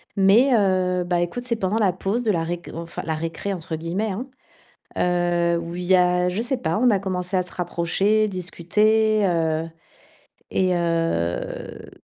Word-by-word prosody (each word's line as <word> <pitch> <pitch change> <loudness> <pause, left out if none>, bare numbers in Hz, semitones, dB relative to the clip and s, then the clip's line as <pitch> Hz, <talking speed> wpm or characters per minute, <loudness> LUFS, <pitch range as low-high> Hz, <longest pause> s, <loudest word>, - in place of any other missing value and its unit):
mais, 205 +7 +5
heu, 185 -3 +2
bah, 175 0 0
écoute, 175 +8 -3
c'est 245 -2 -1
pendant 205 -1 -1
la 205 -4 +3
pause 220 +6 -2
de 220 - +2
la 170 -4 0
réc 175 +1 -5
enfin, 170 +1 -6
«la 160 - -1
récré», 165 +5 -4
entre 165 -3 -5
guillemets, 175 +7 -2
hein? 230 +8 -5 0.7
Heu, 175 -1 +1
où 170 0 -6
il 180 0 -4
y 185 +1 +4
a 180 0 +3
je 180 +4 -2
sais 245 +3 -1
pas, 165 -8 -1
on 245 +2 +4
a 200 -3 +2
commencé 185 -1 -2
à 185 - +2
se 180 - -10
rapprocher, 190 +5 +1
discuter, 210 +4 +1
heu 165 -2 0 0.8
et 185 -1 +2
heu 165 - -2
180 Hz, 175 wpm, -23 LUFS, 170-205 Hz, 0.8 s, mais